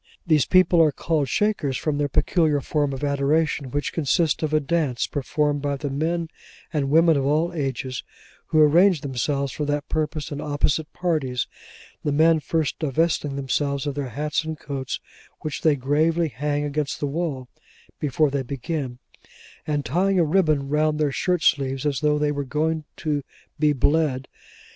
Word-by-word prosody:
These 155 -5 +3
people 185 -2 +5
are 155 -2 +5
called 150 -1 -1
Shakers 180 -11 0
from 150 -2 -1
their 145 -1 0
peculiar 155 +1 +2
form 145 0 0
of 135 +1 -6
adoration, 140 0 +1
which 145 +2 -2
consists 160 +1 +1
of 155 -1 -1
a 155 - +3
dance, 145 -4 0
performed 145 +1 -1
by 145 0 -1
the 145 0 -4
men 165 +4 -1 0.5
and 140 -3 0
women 165 +1 +5
of 135 - 0
all 160 +4 +1
ages, 130 -4 -3 0.5
who 155 - +2
arrange 165 +3 +5
themselves 140 0 -1
for 150 - -4
that 145 0 -2
purpose 155 -1 -2
in 145 0 -4
opposite 150 +1 -1
parties: 150 -8 -1 0.6
the 150 - 0
men 160 +2 +4
first 155 0 -1
divesting 150 -1 0
themselves 140 +1 -1
of 145 - -1
their 140 -2 -4
hats 150 +6 -1
and 160 0 -5
coats, 135 -2 -4 0.4
which 155 -2 -4
they 155 -2 +4
gravely 155 +5 +1
hang 145 +2 -2
against 145 0 -2
the - - -1
wall 140 -3 -3 0.5
before 150 0 +1
they 140 -1 0
begin; 135 0 -4 0.7
and 145 -2 -1
tying 185 +9 +1
a - - +5
ribbon 155 -4 +2
round 150 +1 +1
their 150 -2 +1
shirt 180 +4 0
sleeves, 135 -2 +1
as 140 -3 0
though 150 0 +2
they 150 0 +1
were 145 -1 -2
going 155 +3 -1
to 150 -3 -1 0.4
be 150 0 +4
bled. 145 -1 +1
150 Hz, 170 wpm, -24 LUFS, 140-160 Hz, 0.7 s, people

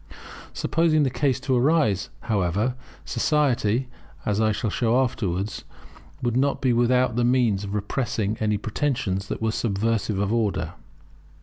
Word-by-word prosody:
Supposing 160 -2 +2
the 135 - +1
case 135 -2 +1
to 135 -2 +1
arise, 125 - +2
however, 105 +1 0 0.3
society, 130 -5 +1 0.4
as 105 +1 +1
I 110 0 +3
shall 105 0 -2
show 120 +1 +2
afterwards, 100 -6 -2 0.6
would 120 -1 0
not 140 +2 +1
be 130 -2 +2
without 125 0 +2
the 120 - +2
means 120 -5 +2
of 100 +1 -4
repressing 110 0 -1
any 105 -1 +1
pretensions 105 -4 -2
that - - -4
were 110 - +2
subversive 110 -1 -1
of 100 +2 0
order. 100 -8 0
115 Hz, 140 wpm, -24 LUFS, 105-130 Hz, 0.6 s, I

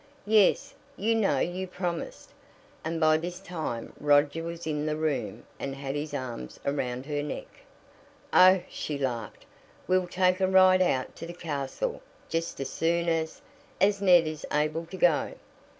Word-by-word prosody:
"Yes; 215 +6 +3 0.2
you 225 +3 +1
know 210 -10 +2
you 180 +6 -2
promised," 180 -2 -5 0.5
and 165 +1 -2
by 155 -1 +5
this 175 +3 -5
time 160 -11 -5
Roger 145 +2 +3
was 170 +1 -6
in 150 -1 -2
the 155 - 0
room 150 -10 -2 0.2
and 135 -1 -4
had 135 0 -4
his 145 +1 -3
arms 125 - -6
around 130 -2 -2
her 145 -1 -2
neck. 145 - -5 0.9
"Oh," 185 0 +7
she 150 - -4
laughed, 120 -6 -4 0.4
"we'll 185 -1 +2
take 185 +1 +2
a 190 - +4
ride 185 0 +6
out 130 -8 0
to 165 - -7
the 175 - -8
castle 155 - -3 0.3
just 165 -2 -2
as 135 -1 -4
soon 170 +1 0
as 160 -1 -2 0.4
as 200 +1 +3
Ned 180 -4 +6
is 155 -1 -5
able 155 +2 0
to 190 - -8
go." 170 -4 +2
165 Hz, 160 wpm, -28 LUFS, 145-185 Hz, 0.9 s, Oh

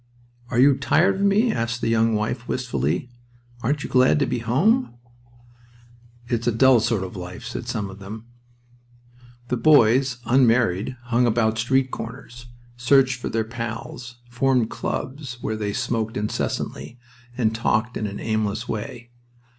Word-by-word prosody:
"Are 120 - -2
you 135 +1 +6
tired 170 +7 +2
of - - -3
me?" 205 +4 +3
said 115 - -2
the - - -2
young 115 0 +2
wife, 110 +3 -2
wistfully. 115 - -2 0.5
"Aren't 140 +5 -1
you - - -5
glad 130 +3 +4
to 145 - +2
be 125 -1 -2
home?" 155 - +1 1.3
"It's 120 -1 -2
a - - +4
dull 130 +2 +5
sort 110 -3 0
of 95 +2 -7
life," 90 +5 -8
said 120 +1 -6
some 115 -5 -2
of 95 +1 -11
them. 105 +3 -9 1.2
The 125 - 0
boys, 130 -2 +4
unmarried, 120 -3 +2
hung 120 0 +2
about 110 -1 +1
street 130 +3 +1
corners, 120 +1 -8 0.3
searched 130 0 +3
for - - -4
their 115 0 0
pals, 120 +1 -6
formed 125 -1 +1
clubs 130 -2 -4
where 110 - -2
they 105 -1 -2
smoked 115 -1 -2
incessantly, 105 +3 -3 0.4
and 110 -3 +1
talked 110 +1 0
in 110 - -2
an 100 - -6
aimless 110 +1 -2
way. 115 +2 -6
120 Hz, 150 wpm, -23 LUFS, 110-130 Hz, 1.3 s, you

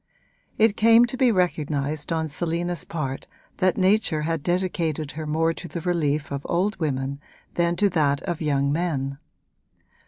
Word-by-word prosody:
It 220 -1 +4
came 230 +2 +6
to 240 - -5
be 255 -2 +4
recognised 155 -5 -1
on 160 -1 0
Selina's 170 +2 -2
part 135 -5 -4 0.3
that 185 0 +2
nature 185 -5 +2
had 165 -1 -1
dedicated 170 -4 -1
her 155 0 -6
more 165 +2 +1
to 175 - -8
the 170 - -5
relief 155 -5 0
of 140 -1 -3
old 195 +5 +1
women 140 -3 -2 0.3
than 170 0 +1
to 205 +3 +3
that 145 -5 +1
of 175 -3 -3
young 140 -2 +1
men. 140 -4 -1
165 Hz, 155 wpm, -24 LUFS, 145-180 Hz, 0.3 s, came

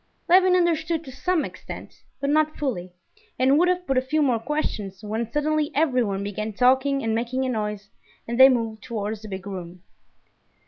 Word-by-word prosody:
Levin 365 +1 +5
understood 330 -2 +1
to 265 - -10
some 340 +5 0
extent, - - -10 0.2
but 280 0 0
not 310 0 +2
fully, 195 -11 -3 0.5
and 265 +3 +4
would 355 - +4
have 360 0 0
put 270 -4 +2
a - - -2
few 300 +4 0
more 250 -5 +2
questions, 215 -8 -3
when 220 +2 -3
suddenly 300 +1 0
everyone 250 -10 +1
began 215 +2 -4
talking 265 +4 +3
and 225 -1 0
making 245 +3 -1
a - - -1
noise 210 -3 -3 0.4
and 235 +2 -3
they 265 +1 +10
moved 225 -4 -1
towards 215 -1 -4
the 215 - -9
big 190 -2 -6
room. 180 -2 -8
255 Hz, 180 wpm, -24 LUFS, 215-300 Hz, 0.5 s, they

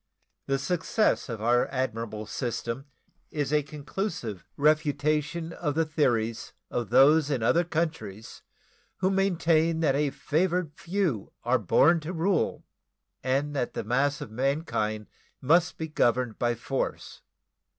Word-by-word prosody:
The 135 - +1
success 180 - 0
of 115 -2 -5
our 120 +1 +3
admirable 115 -5 -3
system 120 +2 -4 0.4
is 145 -1 -2
a 150 - +4
conclusive 145 - -5
refutation 150 +2 +1
of 145 -4 -2
the 165 0 +2
theories 120 -8 0 0.2
of 120 -4 -2
those 140 +5 +5
in 130 -6 0
other 165 +9 +4
countries 155 - -4 0.6
who 185 +1 +1
maintain 165 -4 +2
that 150 -4 +3
a 145 +1 +1
"favored 165 +4 0
few" 170 - -2
are 125 +2 +2
born 150 - +4
to 160 +3 -6
rule 175 +1 0 0.6
and 140 +3 0
that 125 - -2
the - - -2
mass 135 +6 +1
of - - -7
mankind 115 -5 -1 0.3
must 165 +6 +3
be 160 - -3
governed 125 -5 +1
by 120 -1 +1
force. 130 +3 -4
145 Hz, 130 wpm, -27 LUFS, 120-160 Hz, 0.6 s, those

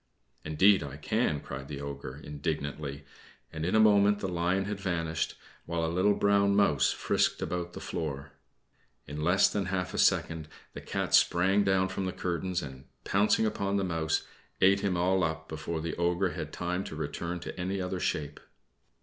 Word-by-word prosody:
"Indeed, 95 +6 +4
I 70 -1 -6
can," 80 -3 0
cried 65 +1 -7
the 70 -1 -6
Ogre, 70 -1 -6
indignantly; 75 -1 -4 0.5
and 80 0 -4
in 90 +5 +1
a - - +6
moment 105 -1 +5
the 100 - -3
lion 90 +2 0
had 100 0 -4
vanished, 85 -4 -2 0.3
while 85 -1 -1
a 80 - -2
little 95 +3 +3
brown 100 0 +3
mouse 75 -9 +3
frisked - - +1
about 90 0 -3
the - - -7
floor. 70 -4 -4 0.7
In 75 +1 -6
less 90 +4 +5
than 100 -2 -1
half 90 -1 -2
a - - -2
second 80 -2 +2 0.3
the - - -7
Cat - - -3
sprang 95 +4 +4
down 95 -1 +2
from 95 0 -3
the 95 - -2
curtains 90 0 -2
and, 65 -2 -9 0.2
pouncing 105 +2 +3
upon 100 -2 0
the 100 - 0
mouse, 80 -3 -1 0.3
ate 95 +1 +5
him 95 -3 0
all 95 +1 +2
up 80 -1 -2
before 80 +1 -4
the 85 0 -3
Ogre 90 +2 +1
had - - -5
time 90 +1 -2
to - - -7
return 85 +3 -4
to 85 - -7
any 95 +2 -2
other 90 0 -3
shape. 75 -4 -2
90 Hz, 180 wpm, -29 LUFS, 80-95 Hz, 0.7 s, a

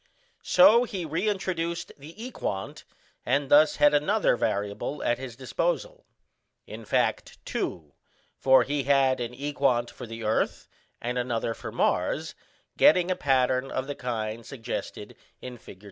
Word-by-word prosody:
So 245 -3 +6
he 195 -7 -4
reintroduced 170 0 -2
the 150 +4 -13
equant, 100 - -5 0.4
and 135 +2 0
thus 150 +2 +6
had 145 0 +4
another 190 - +2
variable 105 +4 -2
at 120 - 0
his 130 -3 -7
disposal - - -3 0.6
in - - -9
fact, - - 0
two, 85 - -4 0.4
for 130 0 +5
he 145 -2 -2
had 135 -2 +3
an 120 0 -4
equant 135 -3 0
for 125 - -9
the 115 0 -7
earth 110 +1 -1 0.3
and 125 +1 -2
another 120 -2 -1
for - - -8
Mars, - - 0 0.4
getting 180 0 +5
a - - +1
pattern 130 -2 +1
of 130 - -3
the 145 - -4
kind 115 -3 -4
suggested 115 -1 -6 0.2
in 125 -2 -9
Fig. 95 - -13
135 Hz, 140 wpm, -27 LUFS, 120-160 Hz, 0.6 s, So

